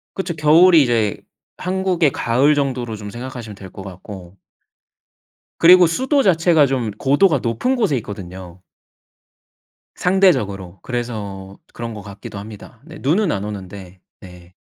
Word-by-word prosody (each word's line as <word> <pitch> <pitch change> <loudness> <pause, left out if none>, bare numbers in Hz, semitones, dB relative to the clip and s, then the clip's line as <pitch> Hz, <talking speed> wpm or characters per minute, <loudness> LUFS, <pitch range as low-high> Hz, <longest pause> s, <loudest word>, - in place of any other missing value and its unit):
그쵸. 180 -4 -4
겨울이 160 +3 +6
이제 115 -5 0 0.4
한국의 180 -5 0
가을 130 +6 +2
정도로 125 -5 -2
좀 105 -1 -8
생각하시면 120 -2 -8
될 95 -1 -11
것 95 - -10
같고 95 -1 -11 1.2
그리고 180 +1 +7
수도 265 - +1
자체가 165 -4 +4
좀 125 -5 -2
고도가 145 - +2
높은 115 - 0
곳에 210 - +1
있거든요. 95 -4 -9 1.3
상대적으로. 100 - +1
그래서 105 -6 -6 0.2
그런 115 -1 -6
것 105 - -8
같기도 100 0 -10
합니다. 110 +3 -12
네 160 -1 -11
눈은 170 +6 +1
안 100 - -3
오는데 95 -2 -9 0.2
네. 90 -1 -14
120 Hz, 285 characters per minute, -19 LUFS, 100-165 Hz, 1.3 s, 그리고